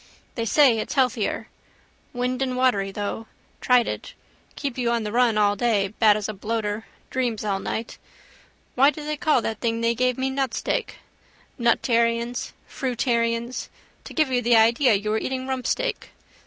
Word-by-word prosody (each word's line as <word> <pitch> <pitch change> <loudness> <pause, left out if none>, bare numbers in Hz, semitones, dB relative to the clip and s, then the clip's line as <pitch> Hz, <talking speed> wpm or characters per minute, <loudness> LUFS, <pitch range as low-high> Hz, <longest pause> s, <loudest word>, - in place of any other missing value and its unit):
They 230 - -3
say 245 -1 +4
it's 215 - -4
healthier. 255 -5 0 0.6
Windandwatery 250 -4 0
though. 205 +2 -4 0.3
Tried 250 -2 +4
it. - - -6 0.4
Keep 275 -4 -4
you 240 -1 +1
on 235 -1 0
the 210 - -4
run 235 -2 +3
all 205 -1 +3
day. 205 -3 +1
Bad 215 0 +4
as 210 - -3
a 215 - -4
bloater. 210 +1 -3 0.2
Dreams 240 -5 -1
all 195 -2 0
night. 225 +3 -5 0.7
Why 275 +3 +5
do 300 0 -6
they 300 0 -2
call 300 -6 +2
that 220 -1 -3
thing 230 -1 -1
they 230 0 +2
gave 250 +1 0
me 265 0 -1
nutsteak? 275 - -2 0.6
Nutarians. 235 0 +1 0.2
Fruitarians. 235 -2 -1 0.4
To - - -9
give 310 -5 +2
you 250 -1 +2
the 240 0 +3
idea 230 +2 +5
you 210 +2 -1
are 220 - +1
eating 260 +1 -3
rumpsteak. 265 - -2
235 Hz, 155 wpm, -24 LUFS, 220-255 Hz, 0.7 s, Why